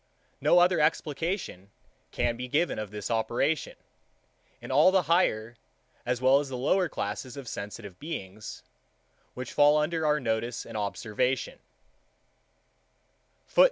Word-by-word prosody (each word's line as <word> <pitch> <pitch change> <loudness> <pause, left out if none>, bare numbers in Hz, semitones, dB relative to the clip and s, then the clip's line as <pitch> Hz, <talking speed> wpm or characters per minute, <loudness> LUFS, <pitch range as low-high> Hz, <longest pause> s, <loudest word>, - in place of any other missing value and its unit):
No - - +5
other 175 -1 +5
explication 150 - -1 0.4
can 120 -1 0
be 125 +1 -5
given 155 +3 0
of 105 -1 -4
this 105 +2 -5
operation, 120 +7 0 0.8
in - - -8
all 150 +7 +6
the 190 -1 +3
higher, 120 -9 +1 0.5
as 125 0 0
well 130 +2 +5
as 140 -2 -5
lower 150 +9 +1
classes 120 +6 -4
of 135 -3 -8
sensitive 100 -2 -7
beings, 110 - -7 0.7
which 125 -1 -6
fall 145 +1 +5
under 160 +2 0
our 150 0 +3
notice 115 -1 -2
and - - -10
observation. 105 +5 -1
130 Hz, 120 wpm, -28 LUFS, 110-155 Hz, 0.8 s, all